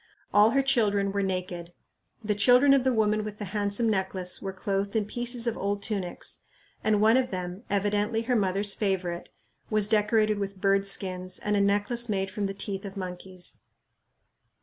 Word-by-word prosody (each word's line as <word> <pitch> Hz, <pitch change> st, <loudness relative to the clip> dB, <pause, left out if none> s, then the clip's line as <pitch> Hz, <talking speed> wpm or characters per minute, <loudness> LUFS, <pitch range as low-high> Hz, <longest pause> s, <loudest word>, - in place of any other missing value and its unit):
All 210 Hz, +1 st, +6 dB
her 275 Hz, +3 st, +2 dB
children 205 Hz, -7 st, +2 dB
were 200 Hz, 0 st, -1 dB
naked. 180 Hz, -2 st, -3 dB, 0.5 s
The 210 Hz, 0 st, +1 dB
children 250 Hz, +6 st, +6 dB
of 275 Hz, -2 st, +4 dB
the 260 Hz, -, +2 dB
woman 215 Hz, -2 st, +1 dB
with 210 Hz, -1 st, -6 dB
the 210 Hz, -, -5 dB
handsome 205 Hz, +3 st, -1 dB
necklace 190 Hz, -3 st, -1 dB
were 195 Hz, -, -4 dB
clothed 195 Hz, +2 st, -2 dB
in 215 Hz, -2 st, +1 dB
pieces 240 Hz, +2 st, -2 dB
of 235 Hz, -, 0 dB
old 200 Hz, 0 st, -2 dB
tunics, 195 Hz, -5 st, -3 dB, 0.4 s
and 215 Hz, -1 st, +2 dB
one 220 Hz, +3 st, +5 dB
of 255 Hz, -1 st, +1 dB
them, 180 Hz, 0 st, -5 dB
evidently 205 Hz, +3 st, 0 dB
her 245 Hz, +2 st, 0 dB
mother's 200 Hz, -1 st, +1 dB
favorite, 185 Hz, -4 st, -2 dB, 0.4 s
was 215 Hz, -2 st, +2 dB
decorated 215 Hz, 0 st, +2 dB
with 200 Hz, -1 st, -4 dB
bird 195 Hz, 0 st, +2 dB
skins 185 Hz, -2 st, -1 dB
and 210 Hz, 0 st, -1 dB
a 200 Hz, -, +3 dB
necklace 205 Hz, +4 st, +1 dB
made 195 Hz, -2 st, -1 dB
from 200 Hz, +1 st, -2 dB
the 195 Hz, -, -5 dB
teeth 195 Hz, -1 st, -3 dB
of 200 Hz, 0 st, -7 dB
monkeys. 185 Hz, -1 st, -7 dB
205 Hz, 175 wpm, -27 LUFS, 195-215 Hz, 0.5 s, All